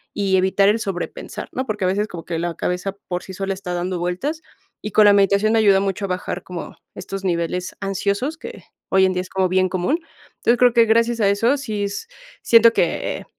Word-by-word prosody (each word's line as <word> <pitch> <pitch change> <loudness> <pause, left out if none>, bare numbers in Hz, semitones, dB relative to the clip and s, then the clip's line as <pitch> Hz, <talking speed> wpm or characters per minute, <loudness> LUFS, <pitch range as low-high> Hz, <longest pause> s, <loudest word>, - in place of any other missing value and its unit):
y 195 -2 +1
evitar 190 +2 +3
el 210 - +3
sobrepensar, 195 -5 -5
¿no? 260 - -2
Porque 210 -5 -2
a - - +2
veces, 205 +3 0
como 170 -4 -8
que 165 0 -4
la 170 +1 -2
cabeza 180 +3 -2 0.2
por 180 -1 -3
sí 190 - -9
sola 195 +1 -3
está 190 -2 -6
dando 180 +1 -2
vueltas, 185 - -3 0.4
y 210 - -4
con 210 +2 +5
la 205 - +7
meditación, 200 +2 +3
me 225 - +4
ayuda 200 -3 +5
mucho 195 0 -2
a - - -3
bajar 180 -1 -4
como, 180 -2 -8 0.2
estos 195 0 -7
niveles 180 0 -2
ansiosos, 200 - -2
que - - -10 0.3
hoy 190 0 +4
en 185 - +1
día 180 - -1
es 185 - -10
como 190 -1 0
bien 185 0 +2
común. 185 - 0 0.4
Entonces, 240 +1 +2
creo 245 -1 +5
que 235 -1 +5
gracias 230 +1 +2
a 205 - +3
eso, 230 +7 +2
sí, 215 -7 -3
s 200 - -5 0.4
siento 230 0 +6
que, - - 0
eh, - - -14
195 Hz, 225 wpm, -21 LUFS, 185-215 Hz, 0.4 s, la